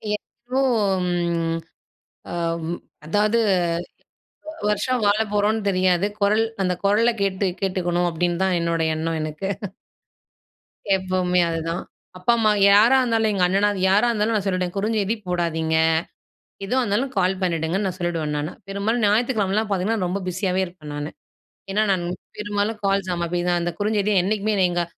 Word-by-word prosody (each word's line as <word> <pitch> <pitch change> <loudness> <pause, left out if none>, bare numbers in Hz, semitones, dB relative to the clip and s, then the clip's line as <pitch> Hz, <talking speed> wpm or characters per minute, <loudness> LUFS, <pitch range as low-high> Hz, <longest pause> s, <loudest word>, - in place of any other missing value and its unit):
எ - - -2 0.3
றோம் 210 -9 +1 1.2
அவ்வு 170 -1 -2 0.3
அதாது 210 +6 +2 1.1
வ 315 - -5 0.2
வருஷம் 245 +3 0
வாழப் 210 +1 +2
போறோம்னு 210 +2 +2
தெரியாது. 185 0 +2 0.2
குரல் 215 +3 +3 0.2
அந்த 180 -1 +1
குரலை 220 +4 +3
கேட்டு 195 0 0
கேட்டுக்கணும், 175 -2 0
அப்படின்னு 175 +1 -1
தான் 190 -1 +2
என்னோட 170 -1 0
எண்ணம் 160 +1 -2
எனக்கு. 155 +5 -4 1.5
எப்பவுமே 185 -1 +1
அதுதான். 165 +1 -3 0.3
அப்பாம்மா, 220 +2 +3 0.2
யாரா 220 +6 +6
இருந்தாலும், 225 -3 +1
எங்க 190 -2 +1
அண்ணனா 200 +3 +2
அது 195 - -5
யாரா 210 +5 +4
இருந்தாலும் 220 0 +1
நான் 205 - 0
சொல்லிடுவேன். 185 -2 -1
குறுஞ்செய்தி 215 +1 0
போடாதீங்க. 160 -2 0 0.9
எதுவா 255 +6 +1
இருந்தாலும் 240 +5 0
கால் 190 0 +2
பண்ணிடுங்கன்னு 175 +3 0
நான் 185 - -4
சொல்லிடுவேன் 165 -4 -2
நானு. 150 +3 -3 0.2
பெரும்பாலும் 210 +4 -1
ஞாயித்துக்கிழமைலாம் 215 -1 +1
பார்த்தீங்கன்னா 195 +1 0
ரொம்ப 190 +3 -2
பிஸியாவே 185 +1 0
இருப்பேன் 170 -4 -11
நானு. 145 +1 -4 0.6
ஏன்னா 210 +2 +2
நான் 185 -2 0 0.3
பெரும்பாலும் 205 +1 -2
கால்ஸ் 195 -1 +1
ஆமா 170 0 -1
அப்டிதான், 175 0 0
அந்த 175 0 -1
குறுஞ்செய்தியை 205 -1 +1
என்னைக்குமே 215 +2 0
என்ன 190 -2 +3
எங்க, 175 0 0
195 Hz, 140 wpm, -23 LUFS, 175-210 Hz, 1.5 s, யாரா